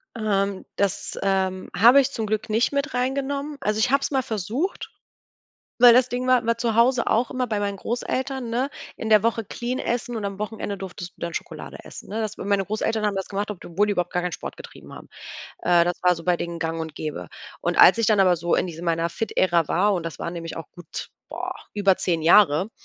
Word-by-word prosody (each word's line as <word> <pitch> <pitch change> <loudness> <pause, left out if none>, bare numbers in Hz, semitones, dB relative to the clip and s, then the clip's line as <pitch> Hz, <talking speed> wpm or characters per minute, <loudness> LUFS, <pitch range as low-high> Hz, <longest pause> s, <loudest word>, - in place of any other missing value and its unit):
Ähm, 200 -3 -1
das, 200 -2 -1
ähm, 190 -1 0
habe 240 +7 +8
ich 275 +1 -2
zum 225 -4 -3
Glück 215 +1 -2
nicht 225 +3 +2
mit 285 +1 -1
rein 250 +1 0
genommen. 280 +1 -3
Also 210 +1 0
ich 225 +3 +2
habe 275 0 +4
es - - -2
mal 265 -2 +1
versucht, 225 - -3 0.9
weil 240 -1 +9
das 250 0 +4
Ding 250 +1 -3
war 255 -2 +4
war 230 0 +1
zu 235 -2 0
Hause 240 +2 +3
auch 235 +3 +1
immer 255 -1 -1
bei 215 -3 -2
meinen 200 -1 -2
Großeltern, 255 +3 -3
ne? 250 +4 0 0.3
In 220 - -4
der 215 -2 +6
Woche 230 0 0
clean 245 +5 -4
essen 240 0 -2
und 215 - -4
am 200 0 -4
Wochenende 210 -1 -4
durftest 185 -2 -7
du - - -26
dann 170 -1 -4
Schokolade - - -7
essen, - - -11
ne? 215 +3 -3
Das 215 -1 -3
weil, - - -7
meine 200 -1 +2
Großeltern 215 +1 -1
haben 205 - 0
das 195 -1 -3
gemacht, 205 +1 -3
ob 190 - -14
d - - -10
wohl 205 +2 +4
die 210 - +1
überhaupt 180 -2 -2
gar 180 - 0
keinen 180 0 -2
Sport - - -6
getrieben - - -12
haben. - - -11 0.5
Äh, 175 -1 +4
das 175 0 -2
war 180 0 +4
so 165 - -9
bei 180 -1 +2
denen 170 0 -5
gang 165 0 -2
und 160 -2 -6
gäbe. 145 - -5 0.3
Und - - -1
als 190 - +8
ich 230 - +2
dann 210 -2 +4
aber 185 -2 +5
so 170 +1 0
in - - +1
diese 165 0 -8
meiner 165 -1 0
Fit-Ära 175 -7 +1
war, 200 +7 +2
und 175 -3 -3
das 165 - -6
waren 170 - -3
nämlich 165 -1 -6
auch 165 - -8
gut, 175 -3 -8 0.2
boah, - - -4 0.2
über 200 -2 +3
10 170 -3 -1
Jahre, 180 +2 +5
205 Hz, 240 wpm, -24 LUFS, 180-235 Hz, 0.9 s, weil